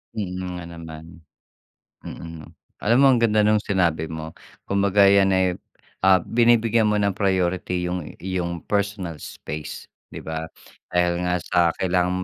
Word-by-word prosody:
Mm, 100 -4 -3 0.2
nga 90 - -6
naman. 80 -1 -9 1.0
Mm. 80 -2 -9 0.3
Alam 115 +3 +3
mo - - +8
ang 125 - +3
ganda 110 -2 +3
'nung 105 0 +4
sinabi 85 -6 0
mo. 80 0 -6 0.3
Kumbaga 100 0 +3
'yan 100 0 +5
ay, 95 0 +3 0.5
ah, 95 -2 +5
binibigyan 115 -1 +3
mo 105 - +1
ng 100 -1 +1
priority 90 -2 0
'yung 90 -3 -4
iyong 85 -2 -4
personal 100 -6 -2
space 75 0 -7 0.2
'di - - -9
ba? 80 0 -4 0.4
Dahil 90 0 +1
nga 90 0 0
sa 90 - 0 0.2
kailangan 90 0 0
90 Hz, 140 wpm, -23 LUFS, 85-100 Hz, 1.0 s, mo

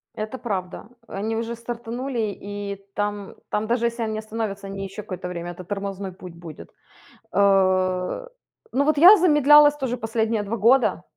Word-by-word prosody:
Это 215 +4 -5
правда, 190 -7 -4 0.2
э, - - -13
они 220 +3 -2
уже 230 +1 -3
стартанули, 235 -1 -4
и 200 -1 -6
там 205 -1 -3
там 210 +1 -1
даже 235 0 +1
если 235 0 -1
они 220 -1 -3
остановятся, 215 -3 -5
они 195 0 -5
еще 195 +2 -7
какое-то 185 -2 -6
время, 175 -1 -5
это 180 +1 -10
тормозной 195 0 -4
путь 180 -2 -11
будет, 170 -3 -11 0.6
э. 185 - +2 0.5
Ну 280 +2 +3
вот 305 0 +2
я 370 +7 +10
замедлялась 295 -3 +6
тоже 260 -3 -2
последние 225 -1 -1
2 210 +3 -3
года. 245 +5 +3
215 Hz, 160 wpm, -23 LUFS, 195-235 Hz, 0.6 s, я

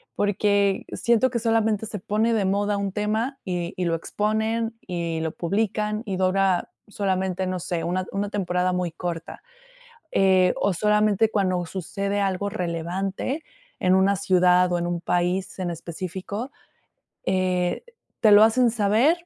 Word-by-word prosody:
porque 205 -1 +1
siento 235 +2 +2
que 240 - -1
solamente 225 -2 +1
se 210 -2 -6
pone 215 +4 0
de 210 -3 +1
moda 205 +1 +1
un 200 -1 -2
tema, 220 +6 -1
y 175 -1 -3
y 180 - -1
lo 165 - +1
exponen, 220 +5 -1
y 170 -2 -2
lo 160 - -2
publican, 210 +4 -1
y 195 -3 -3
dura 185 -1 +1 0.2
solamente, 190 -2 -1
no 185 0 -2
sé, 175 -1 -3
una 185 +2 -1
una 200 +1 -2
temporada 180 -3 0
muy 180 -2 -1
corta, 170 -1 -6 0.7
eh, 185 -1 +4
o 200 - +1
solamente 210 +2 +2
cuando 185 -4 0
sucede 200 +3 -3
algo 195 +1 -1
relevante 185 - -3 0.4
en 185 0 +3
una 190 +1 +3
ciudad, 180 -1 +4
o 175 - +2
en 175 - -2
un 175 -1 -2
país 180 +2 -1
en 180 -2 -2
específico, 185 - -6 0.7
eh, 185 -1 0 0.4
te 220 -3 +6
lo 205 +1 +9
hacen 235 +2 +4
saber, 235 - +2
195 Hz, 150 wpm, -24 LUFS, 180-210 Hz, 0.7 s, lo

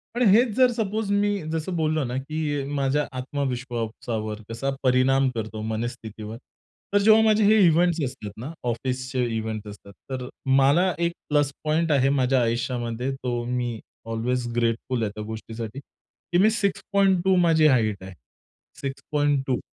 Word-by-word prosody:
पण 250 - +2
हेच 235 +6 +6
जर 255 -1 +5
सपोज 215 -2 -2
मी 205 0 +2 0.2
जसं 165 +3 -2
बोललो 155 -2 +1
ना 125 0 -3
की 155 +4 -4 0.2
अ, - - -5
माझ्या 140 +1 +1
आत्मविश्वासावर 120 -5 -3
कसा 120 +4 -3
परिणाम 130 +1 +3
करतो, 110 -1 -4
मनस्थितीवर 110 -1 -5 0.6
तर - - +5
जेव्हा 220 +1 +7
माझे 215 -1 +4
हे 215 +2 +5
इव्हेंट्स 170 +1 +3
असतात 105 -5 -7
ना, 130 +8 -6
ऑफिसचे 130 +2 -2
इव्हेंट्स 110 -1 -4
असतात 100 -1 -12 0.2
तर 125 -1 -4 0.3
मला 165 +7 +4
एक 170 - +1 0.2
प्लस 145 -1 +2
पॉइंट 155 +1 +1
आहे 135 -2 +3
माझ्या 130 -2 +2
आयुष्यामध्ये 120 +1 -1
तो 125 -3 -3
मी 120 -2 -2 0.3
ऑल्वेज 120 +2 -1
ग्रेटफुल 115 +1 0
आहे 105 - -1
त्या 105 - -5
गोष्टीसाठी 110 +2 -6
की 175 +4 -7
मी 215 - +6
6.2 195 -3 +2
माझी 165 -3 +5
हाईट 110 -8 +2
आहे, 95 0 -9 0.7
6.2 140 -1 -1
130 Hz, 145 wpm, -25 LUFS, 115-160 Hz, 0.7 s, जेव्हा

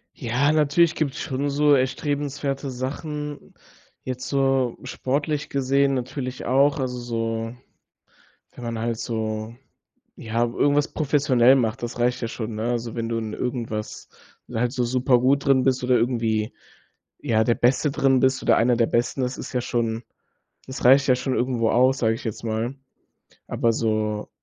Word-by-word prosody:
Ja, 125 +3 +1
natürlich 155 +2 +3
gibt's 140 -4 -2
schon 140 +2 -2
so 145 +1 +4
erstrebenswerte 140 +1 -1
Sachen. 145 +3 -5 0.5
Jetzt 130 0 -5
so 135 -3 +1
sportlich 145 +4 -2
gesehen 140 0 +1
natürlich 130 0 -4
auch, 140 +4 +3
also 125 -1 -2
so 115 -1 -3 1.0
wenn 125 - -10
man 115 -1 -3
halt 115 0 -2
so, 110 -1 -3 0.6
ja, 115 +1 -1
irgendwas 145 +5 +1
professionell 135 -4 +3
macht. 115 0 -1
Das 120 0 -5
reicht 125 +1 +1
ja 115 - -2
schon, 110 -1 -5
ne? 110 - -3
Also, 115 -1 -3
wenn 115 -1 -3
du 115 0 -1
in 110 -1 -4
irgendwas 115 -4 -4 0.4
halt 120 +1 0
so 125 -2 0
super 125 +1 +2
gut 135 +3 +2
drin 135 -2 +4
bist 130 -1 +1
oder 125 0 +3
irgendwie, 115 -2 0 0.7
ja, 110 -6 +2
der 120 +1 +2
Beste 130 +4 +2
drin 135 -1 +2
bist 130 0 +2
oder - - +4
einer 120 +1 +3
der 115 -1 +3
Besten, 120 +3 0
das 125 0 -2
ist - - -7
ja 125 - 0
schon 115 -1 -2 0.6
das 130 +1 -7
reicht 135 +3 +6
ja 125 - +5
schon 130 +1 -2
irgendwo 120 -3 +1
aus, 130 +2 +3
sage 115 -1 +2
ich 115 - -8
jetzt 110 0 -5
mal. 115 +3 -2 0.7
Aber 115 -1 +1
so 110 -1 -1
125 Hz, 160 wpm, -24 LUFS, 115-135 Hz, 1.0 s, reicht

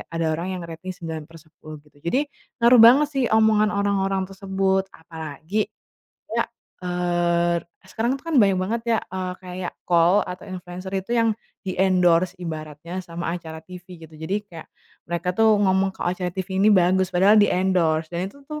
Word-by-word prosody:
ada 165 0 -2
orang 185 +3 -3
yang - - -6
ngerating 170 +3 -7
9/10, 160 -1 -9
gitu. 145 -1 -24
Jadi, 255 - 0 0.4
ngaruh 240 0 +7
banget 255 +6 +8
sih, 270 -2 +1
omongan 220 -1 +4
orang-orang 195 -1 0
tersebut. 190 0 0
Apalagi 160 +5 -4 0.6
kayak, - - 0 0.4
eee, 175 -1 +1
r - - -9 0.2
sekarang 230 +7 -1
tuh 275 - -17
kan - - +3
banyak 195 -3 +4
banget 225 +5 -1 0.2
ya, - - 0
eee, 185 -1 -3
kayak 180 0 -5 0.2
KOL 175 +3 +4
atau 180 0 -8
influenser 185 0 -7
itu 190 +3 -5
yang 230 -1 +3 0.3
di-endorse, 185 -2 +2
ibaratnya, 160 +1 -6
sama 170 0 -6
acara 160 -2 -9
tivi, 180 +1 -11
gitu. 160 -1 -13
Jadi 160 +5 -3
kayak 165 -4 -10 0.4
mereka 170 +1 -3
tuh 225 0 +5
ngomong 190 -1 +2
kalau - - -2
acara 180 -1 -3
tivi 190 +1 -5
ini 210 - +5
bagus, 185 0 +3
padahal 195 +4 +5
di-endorse. 180 -5 +2
Dan 170 - -2
itu - - -19
tuh, 300 0 -5
185 Hz, 165 wpm, -23 LUFS, 170-195 Hz, 0.6 s, banget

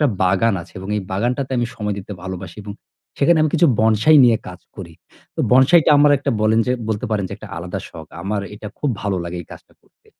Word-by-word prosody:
একটা 150 - +4 0.2
বাগান 95 +4 +2
আছে - - -17
এবং 95 +1 -8
এই - - -1
বাগানটাতে 125 +7 -2
আমি 120 - 0
সময় 105 -1 -3
দিতে 100 +1 -8
ভালোবাসি 95 -1 -7
এবং 100 0 -7 0.5
সেখানে 165 +3 +4
আমি 155 - +1
কিছু 170 +1 +4
বনসাই 110 +8 +4
নিয়ে 120 -2 +5
কাজ 90 0 -11 0.2
করি। 85 -4 -9 0.4
তো - - -1
বনসাইটা 135 +7 +5
আমার 145 0 +5
একটা 135 - -2
বলেন 110 +1 +2
যে 125 - +1 0.2
বলতে 110 +1 -2
পারেন 105 -2 0
যে - - -8
একটা 110 - -11
আলাদা 90 +2 -5
শখ। 80 -1 -11 0.2
আমার 100 +2 -2
এটা 105 +1 -8
খুব 145 - -1
ভালো 100 -2 -1
লাগে 85 +1 -6
এই - - -22
কাজটা - - -15
করতে। - - -35
105 Hz, 225 wpm, -19 LUFS, 95-125 Hz, 0.5 s, নিয়ে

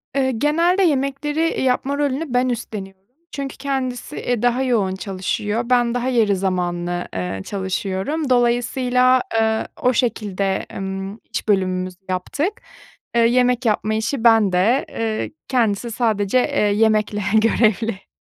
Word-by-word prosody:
Eee, 265 -1 +2
genelde 335 - +2
yemekleri, 290 -1 0
eee, 330 - 0
yapma 265 +2 0
rolünü 285 0 -1
ben 250 +1 +2
üstleniyorum. 195 -4 -6 0.2
Çünkü 275 -1 -5
kendisi, 265 0 -3 0.2
e, 240 -2 0
daha 245 +2 +2
yoğun 205 -7 +1
çalışıyor, 205 +4 -3
ben 240 -1 +3
daha 245 +1 -1
yarı 220 -5 +3
zamanlı, 175 -2 -2
eee, 95 +1 -3
çalışıyorum. 195 - -2
Dolayısıyla, 250 +1 +3
eee, 220 0 +1
o 250 - +3
şekilde, 200 -6 -1
ımm, 195 +2 -5
iş - - -3
bölümümüzü 185 -2 0
yaptık. 290 - -2 0.5
Eee, 235 - +4
yemek 250 +1 +2
yapma 215 0 +1
işi 225 +3 -2
bende. 225 +2 +4
Eee, 220 -1 -3 0.2
kendisi 230 -2 0
sadece, 220 -1 +1
eee, 285 +3 0
yemekle 210 0 +2
görevli. 220 -2 +2
230 Hz, 130 wpm, -21 LUFS, 195-255 Hz, 0.5 s, Eee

